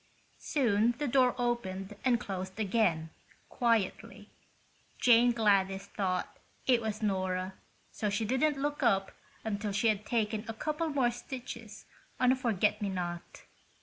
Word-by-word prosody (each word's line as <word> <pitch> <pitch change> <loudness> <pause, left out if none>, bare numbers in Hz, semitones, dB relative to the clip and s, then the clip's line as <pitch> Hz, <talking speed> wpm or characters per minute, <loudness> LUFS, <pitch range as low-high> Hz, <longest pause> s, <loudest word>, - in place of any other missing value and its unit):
Soon 235 -4 +2
the 295 - -1
door 255 -1 +3
opened 210 -5 -2
and 245 -3 +3
closed 190 0 -5
again, 185 -7 +1 0.4
quietly. 230 -5 -1 0.7
Jane 240 0 +6
Gladys 195 -4 +2
thought 185 -3 -3 0.3
it 245 -3 +4
was 220 0 -3
Nora, 185 -2 -1 0.4
so 210 - -2
she 205 +2 -1
didn't 275 +6 +1
look 290 +1 -2
up 195 -6 +2 0.3
until 210 -1 -2
she 200 +3 +2
had 215 -1 0
taken 215 -1 -1
a 225 - -5
couple 305 +6 -2
more 265 -5 +2
stitches 235 -3 -8 0.3
on 250 0 +5
a - - +4
forget 210 -5 +1
me 205 - -1
not. 175 -2 -5
220 Hz, 140 wpm, -31 LUFS, 195-245 Hz, 0.7 s, Jane